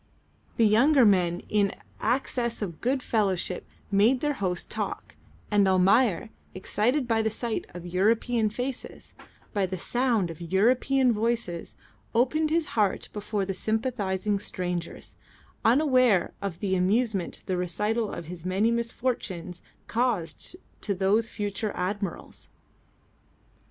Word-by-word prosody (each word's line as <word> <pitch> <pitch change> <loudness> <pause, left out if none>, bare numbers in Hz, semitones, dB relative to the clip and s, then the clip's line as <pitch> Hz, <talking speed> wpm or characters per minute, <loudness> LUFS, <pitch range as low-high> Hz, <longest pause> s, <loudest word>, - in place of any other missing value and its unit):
The 230 - +5
younger 250 +5 +5
men 180 -4 +3
in 205 -1 +2
an - - -11 0.2
access 235 -1 0
of 170 -5 -6
good 260 +2 0
fellowship 190 -5 0 0.2
made 215 +6 +4
their 295 +2 0
host 185 -7 -3
talk, - - -4 0.4
and 205 -2 +4
Almayer, 195 +3 +3 0.2
excited 240 +8 0
by 225 -1 +2
the 220 - +1
sight 225 +1 -3
of 175 -1 -7
European 215 +5 +2
faces, 250 +4 -6 0.4
by 200 -2 +1
the 185 +1 -4
sound 230 -3 0
of 165 - -11
European 245 +8 +3
voices, 220 -6 -2 0.4
opened 305 +6 +2
his 325 0 +1
heart 210 -3 +1
before 210 -1 -2
the 195 - -2
sympathising 210 -2 -1
strangers, 180 -3 -5 0.5
unaware 255 - +4
of 195 -4 -4
the 190 -2 +1
amusement 195 +1 0
the 185 - -1
recital 210 +5 -1
of 170 - -6
his 170 0 -8
many 195 +5 +1
misfortunes 230 -7 -3 0.2
caused 225 - -1 0.3
to 200 - -1
those 205 +5 +2
future 205 0 -3
admirals. 195 0 -4
210 Hz, 125 wpm, -27 LUFS, 185-240 Hz, 0.5 s, The